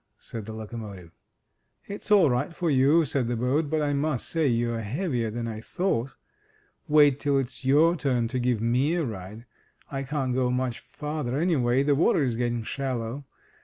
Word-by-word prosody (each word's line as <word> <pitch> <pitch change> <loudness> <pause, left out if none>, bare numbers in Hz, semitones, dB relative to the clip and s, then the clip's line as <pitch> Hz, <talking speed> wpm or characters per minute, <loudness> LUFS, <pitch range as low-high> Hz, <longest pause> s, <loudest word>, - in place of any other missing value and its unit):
said 110 -3 -8
the - - -5
locomotive. 105 -5 -8 0.7
It's 200 +1 -8
all 205 -6 +6
right 140 +7 -1
for 170 -3 0
you,'' 145 +5 +4
said 135 -4 -1
the 120 - -1
boat; 135 +6 0
"but 155 0 0
I 145 -1 0
must 140 -2 -1
say 160 -3 +1
you're 120 -1 0
heavier 120 - -2
than 115 +2 -4
I 110 -1 -5
thought. 135 -4 -2 0.7
Wait 145 -2 +5
till 140 -1 +1
it's 130 -2 -3
your 150 +6 +4
turn 130 -7 0
to 130 +1 -2
give 120 -3 0
me 125 +8 +2
a 170 -3 0
ride. 110 0 -7 0.5
I 135 -1 -3
can't 135 -2 -2
go 125 0 +1
much 125 -1 -1
farther, 150 -4 -4
anyway, 135 -6 +2
the 145 0 +3
water 150 +1 +3
is 125 -4 0
getting 120 -1 -1
shallow. 130 +1 -4
130 Hz, 180 wpm, -26 LUFS, 115-150 Hz, 0.7 s, all